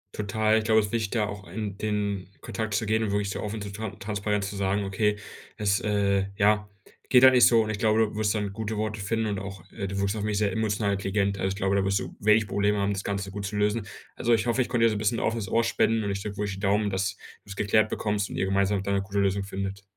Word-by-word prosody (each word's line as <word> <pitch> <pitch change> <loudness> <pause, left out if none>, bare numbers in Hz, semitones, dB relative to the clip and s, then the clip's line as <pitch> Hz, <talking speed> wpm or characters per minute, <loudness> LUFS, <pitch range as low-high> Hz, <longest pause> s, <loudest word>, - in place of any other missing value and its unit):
Total, 110 +1 +1
ich - - -3
glaube, 110 -1 +5
es 105 - +1
ist - - -10
wichtig, 110 -3 -1
da 105 - +2
auch 100 -1 -6
ein 100 +3 -5
den 100 -3 -2
Kontakt 110 -3 -3
zu 110 - 0
gehen 110 +1 +1
und 110 - 0
wirklich 100 -1 -1
so - - -4
offen 105 +1 -4
so 100 - -6
tran 110 0 -6
transparent 105 0 -1
zu 100 +1 -4
sagen: 100 +1 0
„Okay, 105 +2 0 0.4
es, 100 -2 +1
äh 100 -2 +1
ja, 105 0 +3 0.4
geht 125 0 +6
halt 130 0 +9
nicht 125 - +7
so.“ 115 -2 +4
und 110 - -3
ich 105 - -4
glaube, 110 -1 +3
du 110 -1 0
wirst 105 0 +1
dann 105 -2 -2
gute 110 0 -4
Worte 105 0 -2
finden 110 +3 -1
und 105 -3 -2
auch, 95 -2 -8
äh 100 -3 -4
du 100 +1 -4
wirkst 100 +1 0
auf 105 - -3
mich 105 -1 -1
sehr 105 -1 +1
emotional 105 -1 0
intelligent. 100 0 -1
Also 95 - 0
ich 95 - -3
glaube, 95 -1 0
da 100 - +2
wirst 95 0 +1
du - - -7
wenig 105 +1 +4
Probleme 100 +2 +1
haben, 100 0 +1
das 95 - -4
Ganze 100 -1 -3
gut 100 -1 -4
zu 105 - -5
lösen. 105 0 0 0.3
Also 120 0 +2
ich 110 +1 -1
hoffe, 120 +2 +1
ich 125 - -1
konnte 115 -2 +3
dir 115 - +4
so 105 - -2
bisschen 110 +2 +1
offenes 110 -4 -1
Ohr 115 - +2
spenden 115 -1 +1
und 100 - -1
ich 100 0 -3
drücke 100 -1 -6
wirklich 100 -1 -2
die - - -9
Daumen, 100 +1 +1
dass 95 +1 -1
du 100 - -18
es 95 - -6
geklärt 110 +2 +2
bekommst 105 -1 -1
und - - -6
ihr 95 - 0
gemeinsam 100 0 +1
da 100 - -2
'ne 100 - +1
gute 100 +1 -5
Lösung 100 0 +1
findet. 95 0 -5
105 Hz, 280 wpm, -26 LUFS, 100-110 Hz, 0.4 s, halt